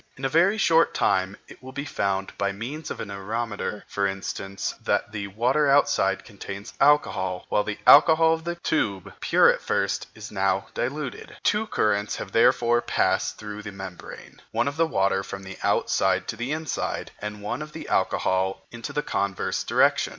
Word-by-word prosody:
In 135 - -5
a - - +1
very 175 +9 +3
short 165 -5 +3
time 95 +1 +1
it - - -14
will 130 0 -10
be 140 +2 -4
found, 95 -7 -2
by 100 0 0
means 130 +10 -6
of - - -5
an 105 - -5
areometer 105 +1 -4
for 100 -1 -1
instance, 95 0 -4
that - - 0
the 105 -2 -4
water 125 +9 +1
outside 100 -8 +3
contains 100 0 -8
alcohol, 95 -11 +2
while 105 - +2
the 105 0 -4
alcohol 160 +2 +7
of 160 0 -3
the 170 +1 -3
tube, 100 - -1
pure - - +4
at - - -7
first, 100 0 -1
is 105 -1 -9
now 95 -1 0
diluted. 140 +3 -4
Two 215 +1 +1
currents 105 - 0
have 95 - -6
therefore 120 +1 +4
passed - - 0
through 105 -1 -7
the 105 -1 -7
membrane, 95 -2 -10
one - - +1
of 145 +3 -4
water 95 -12 +2
from 95 0 -7
the 95 0 -9
outside 95 0 +1
to - - -2
the 120 +4 -4
inside, 155 -2 -3
and 105 0 -6
one 105 - -3
of 150 0 -7
alcohol 95 +1 0
in 120 - -9
the 150 +5 -3
converse 100 -1 -1
direction. - - +3
105 Hz, 175 wpm, -25 LUFS, 100-140 Hz, -, alcohol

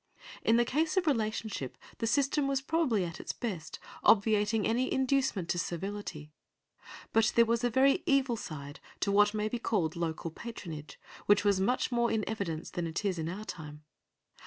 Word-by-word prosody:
In 225 - +4
the 240 - +4
case 315 +8 0
of 370 - +3
relationship 220 - -1 0.2
the 225 - 0
system 275 +3 +2
was 275 -1 +1
probably 270 - +1
at 165 -1 -7
its - - -4
best, 185 -9 -5 0.3
obviating 210 0 +4
any 245 +3 +1
inducement 265 -9 +1
to 175 - 0
servility; 170 -3 -5 0.8
but 225 0 +4
there 235 - +6
was 230 0 0
a 245 - +3
very 270 +8 +4
evil 275 -5 +3
side 145 -7 -7 0.2
to 200 - +1
what 205 +1 +4
may 210 0 0
be 235 +2 -3
called 185 -9 0
local 165 -1 -3
patronage, 165 -8 -8 0.3
which 205 0 +4
was 200 -2 +3
much 245 +7 +1
more 235 -1 +2
in 220 -2 0
evidence 170 -7 -3
than 175 -1 -2
it 165 +6 -3
is 185 -4 0
in 160 0 -2
our 205 +5 -6
time. 150 -5 -8
215 Hz, 180 wpm, -31 LUFS, 175-240 Hz, 0.8 s, there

